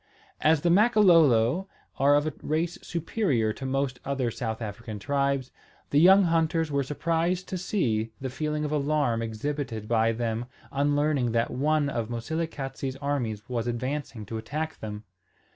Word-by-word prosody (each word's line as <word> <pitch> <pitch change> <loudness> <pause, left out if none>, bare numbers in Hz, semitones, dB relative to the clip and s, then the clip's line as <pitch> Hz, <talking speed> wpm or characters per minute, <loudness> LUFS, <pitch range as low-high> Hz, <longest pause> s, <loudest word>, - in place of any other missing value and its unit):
As 155 -1 +4
the 170 - +2
Makololo 175 - +5 0.3
are 140 +2 +5
of 145 +1 +2
a 155 - -2
race 165 +3 -1
superior 165 - 0
to 135 - -6
most 135 -1 -1
other 135 -3 -1
South 110 -2 -4
African 110 0 -6
tribes, 140 +3 -1 0.4
the 145 - +4
young 190 +4 +7
hunters 165 -2 +1
were 140 0 +1
surprised 165 +6 -1
to 185 - -2
see 115 - 0
the 130 -2 -4
feeling 150 +2 -2
of 150 - -3
alarm 145 -5 +1
exhibited 115 0 -4
by 115 0 +3
them 115 +1 -2 0.2
on 145 +1 +1
learning 145 -5 +1
that 115 0 +1
on 150 +3 +1
of 115 -5 -2
Moselekatse's 135 +1 -3
armies 125 -6 -3
was 120 -2 -2
advancing 125 -1 -3
to 110 +2 -5
attack 155 +7 -4
them. 105 -1 -6
140 Hz, 155 wpm, -27 LUFS, 115-155 Hz, 0.4 s, young